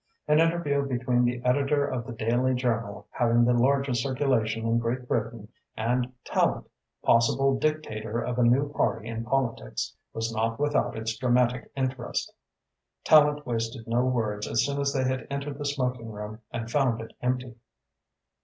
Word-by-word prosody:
An 150 +1 +4
interview 165 -4 +2
between 125 -2 +1
the 120 0 -1
editor 140 +3 +2
of 125 -4 -3
the - - -5
daily 120 +3 +1
journal 115 -4 -2
having 120 0 +3
the 125 - +3
largest 130 0 +2
circulation 120 -4 0
in 115 +1 +2
Great 120 +2 -2
Britain 115 -2 -2 0.3
and 125 +3 0
Tallente, - - +1 0.4
possible 135 +4 +3
dictator 115 -8 -2
of 120 +1 -2
a - - +4
new 135 +5 +3
party 115 -6 0
in 115 0 -4
politics, 115 - -2 0.2
was 115 0 -3
not 115 +1 -1
without 145 -4 +1
its 110 0 -2
dramatic 125 0 +1
interest. 130 -2 -2 0.7
Tallente 150 -1 +5
wasted 115 -1 -3
no 120 +2 +2
words 110 -5 -1
as 115 0 +2
soon 140 0 -1
as 140 0 +1
they 135 -2 0
had 130 -1 -1
entered 140 0 -4
the 145 - -4
smoking 125 -5 -2
room 105 +1 -7
and 115 0 -5
found 130 -5 +2
it 115 - -8
empty. 125 0 -1
125 Hz, 160 wpm, -27 LUFS, 115-135 Hz, 0.7 s, Tallente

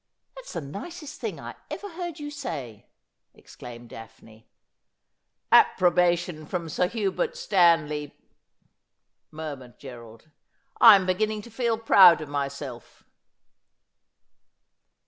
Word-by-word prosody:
' - - -52
That's - - -11
the - - -4
nicest 300 - -9
thing - - -4
I - - -8 0.2
ever 410 - -6
heard 345 -2 -7
you 295 0 -6
say,' 150 - -7 0.5
exclaimed 120 -1 -12
Daphne. 110 0 -14 0.5
' - - -54
Approbation 175 -2 0
from 170 -2 -4
Sir 180 +4 0
Hubert 200 -2 -2
Stanley 160 -6 +1 1.1
murmured 145 -6 -9
Gerald; 120 +1 -13 0.3
' - - -29
I 225 -3 +10
am 190 -2 +1
beginning 210 +3 -1
to 235 - -13
feel 230 0 -1
proud 195 -6 +6
of 155 -2 -8
myself.' 140 -3 -6
170 Hz, 115 wpm, -25 LUFS, 140-215 Hz, 1.1 s, I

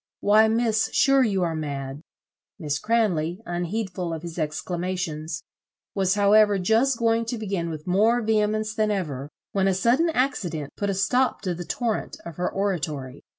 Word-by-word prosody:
Why, 215 +2 +5
Miss, 225 -1 +1
sure 275 0 +4
you 200 -7 +1
are 165 -1 0
mad." 140 -2 -5 0.6
Miss 150 -6 -2
Cranley, 185 -7 +1
unheedful 175 0 -3
of 160 - -8
his 170 0 -6
exclamations, 160 0 -3 0.5
was 190 0 +1
however 205 0 +5
just 225 +7 +2
going 230 0 +2
to 230 +1 -3
begin 195 -6 -2
with 155 -2 -6
more 215 +6 +3
vehemence 215 0 +1
than 215 -1 +1
ever, 150 -9 -3 0.2
when 195 -1 +1
a 190 - +2
sudden 245 - +3
accident 200 - -1
put 205 - -2
a 195 - 0
stop 250 +7 +1
to 185 -3 -2
the 175 +1 -6
torrent 230 +2 -2
of 170 -3 -8
her 180 - -1
oratory. 155 -9 -3
195 Hz, 160 wpm, -25 LUFS, 165-220 Hz, 0.6 s, Why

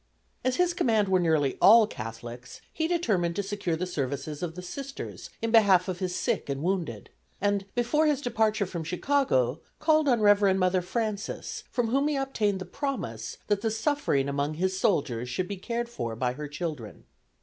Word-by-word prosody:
As 255 0 +1
his 360 -1 +2
command 220 - +2
were 185 -1 +4
nearly 155 -6 +1
all 225 +2 +8
Catholics 120 - -8 0.2
be 320 - 0
determined 210 - +1
to 200 - -1
secure 195 -4 -2
the 175 +3 -2
services 145 -2 -3
of 170 -2 -4
the 180 - -7
Sisters 275 +9 -7
in 230 - 0
behalf 200 -5 +5
of 185 -2 -3
his 180 -2 -2
sick - - -1
and 140 +1 -2
wounded, 170 - -2 0.3
and, 200 -1 +1
before 275 +6 +2
his 295 -3 +2
departure 220 -5 +1
from 175 -3 -5
Chicago, 165 - +1 0.2
called 310 -1 +3
on 240 -3 +3
Reverend 205 -2 +5
Mother 185 0 +2
Frances, 215 +2 -3
from 240 -3 0
whom 275 +4 +2
he 300 - 0
obtained 235 -7 0
the 185 - -6
promise 175 - -4
that 205 -1 0
the 225 - +1
suffering 220 - 0
among 140 +2 -1
his 185 +3 0
soldiers 140 - 0
should 180 +8 -2
be 200 - -5
cared 235 +5 -3
for 115 - -4
by 125 +1 -1
her 150 +3 -6
children. 145 - -6
190 Hz, 185 wpm, -28 LUFS, 150-235 Hz, 0.3 s, all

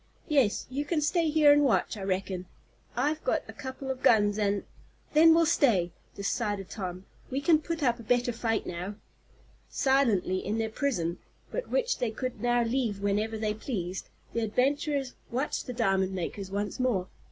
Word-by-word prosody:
Yes, 275 -9 +2
you 280 +3 -1
can 310 +2 0
stay 325 +2 +2
here 300 -1 +6
and 290 0 +4
watch, 265 -4 +2
I 205 - -7
reckon. 190 -1 -2 0.5
I've 295 +6 0
got - - +1
a - - -9
couple 265 0 -5
of 260 -1 -6
guns, 205 -2 +4
and 200 -1 +1 0.3
" - - -33
"Then 320 +2 +7
we'll 335 0 +5
stay," 195 - +3 0.2
decided 200 -1 -2
Tom. 185 -2 -5 0.2
"We 265 - -1
can 310 +2 +4
put 330 0 -3
up 240 -2 +2
a - - -9
better 245 +2 +1
fight 225 -1 -1
now." 180 +4 -5 0.7
Silently, 230 -9 +2
in 210 +3 -1
their 220 -1 -1
prison, 180 - -1 0.3
but - - -4
which - - 0
they 245 - 0
could 245 0 -5
now 240 0 +3
leave 230 -4 -1
whenever 210 +2 0
they 215 -1 -1
pleased, 190 -5 -4 0.2
the - - 0
adventurers 270 +4 0 0.2
watched 260 +5 -2
the - - -3
diamond 195 -5 +1
makers 190 +2 -4
once 200 +3 -3
more. 225 -8 +1
230 Hz, 175 wpm, -29 LUFS, 200-275 Hz, 0.7 s, Then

